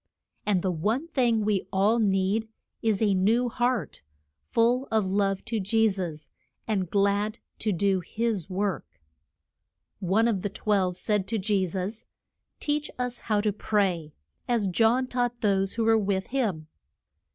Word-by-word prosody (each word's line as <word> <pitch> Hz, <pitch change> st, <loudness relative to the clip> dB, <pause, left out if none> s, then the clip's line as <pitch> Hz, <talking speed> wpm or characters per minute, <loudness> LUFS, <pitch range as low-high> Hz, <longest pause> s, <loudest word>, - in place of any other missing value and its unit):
And 195 Hz, -4 st, +2 dB
the 190 Hz, -, +1 dB
one 220 Hz, -, -1 dB
thing 235 Hz, -8 st, +2 dB
we 200 Hz, -3 st, 0 dB
all 205 Hz, +5 st, +3 dB
need 200 Hz, +1 st, +1 dB, 0.3 s
is 220 Hz, -2 st, +1 dB
a 205 Hz, -2 st, +3 dB
new 225 Hz, +6 st, +2 dB
heart, 240 Hz, 0 st, -1 dB, 0.5 s
full 240 Hz, +3 st, +2 dB
of 220 Hz, -2 st, +2 dB
love 195 Hz, 0 st, 0 dB
to 230 Hz, -2 st, -2 dB
Je 220 Hz, +3 st, +3 dB
sus 170 Hz, -6 st, -5 dB, 0.4 s
and 195 Hz, -5 st, -1 dB
glad 205 Hz, +3 st, +1 dB, 0.2 s
to 215 Hz, -, 0 dB
do 195 Hz, +1 st, +2 dB
his 210 Hz, 0 st, -2 dB
work. 195 Hz, -, -3 dB, 1.0 s
One 200 Hz, +5 st, +2 dB
of 210 Hz, -5 st, 0 dB
the 205 Hz, -, -2 dB
twelve 190 Hz, -3 st, 0 dB
said 205 Hz, -1 st, 0 dB
to 225 Hz, +2 st, -1 dB
Je 195 Hz, -2 st, +1 dB
sus, 190 Hz, +5 st, -4 dB, 0.5 s
Teach 295 Hz, 0 st, -1 dB
us 250 Hz, -1 st, -2 dB
how 210 Hz, -2 st, 0 dB
to 210 Hz, -1 st, 0 dB
pray, 185 Hz, -8 st, 0 dB, 0.3 s
as 235 Hz, -4 st, +1 dB
John 225 Hz, +7 st, +3 dB
taught 245 Hz, -1 st, -2 dB
those 195 Hz, -2 st, +2 dB
who 230 Hz, -, -1 dB
were 225 Hz, 0 st, +5 dB
with 195 Hz, -2 st, -1 dB
him. 205 Hz, -13 st, 0 dB
205 Hz, 150 wpm, -27 LUFS, 190-230 Hz, 1.0 s, were